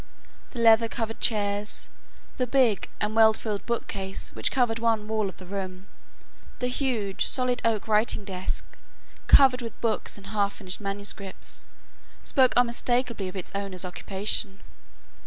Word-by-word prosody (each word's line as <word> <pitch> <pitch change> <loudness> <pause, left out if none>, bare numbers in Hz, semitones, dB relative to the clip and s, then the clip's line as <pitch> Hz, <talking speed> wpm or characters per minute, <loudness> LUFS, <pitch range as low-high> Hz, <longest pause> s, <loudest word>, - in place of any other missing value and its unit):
The - - -11
leather 230 0 +6
covered 225 -1 -4
chairs, 205 -1 0 0.5
the 250 - 0
big 245 -6 +2
and 210 +1 -2
well 220 -1 +7
filled 215 -2 -4
bookcase 195 -5 -4
which - - +1
covered 240 -4 +1
one 225 -2 +1
wall 215 -2 0
of - - -12
the 185 - -11
room, 185 0 -5 0.7
the 250 - -1
huge, 240 -7 -1
solid 250 -1 +1
oak 225 -2 0
writing 215 -1 +2
desk, 185 -2 -4 0.6
covered 260 -2 +7
with 230 -2 -7
books 225 -2 -1
and 200 - -12
half 200 -1 +1
finished 185 0 -8
manuscripts, 200 -1 -3 0.6
spoke 260 -3 +3
unmistakably 240 -3 +1
of 185 - -8
its 185 - -5
owner's 195 -2 -3
occupation. 195 +2 -1
215 Hz, 140 wpm, -26 LUFS, 195-235 Hz, 0.7 s, well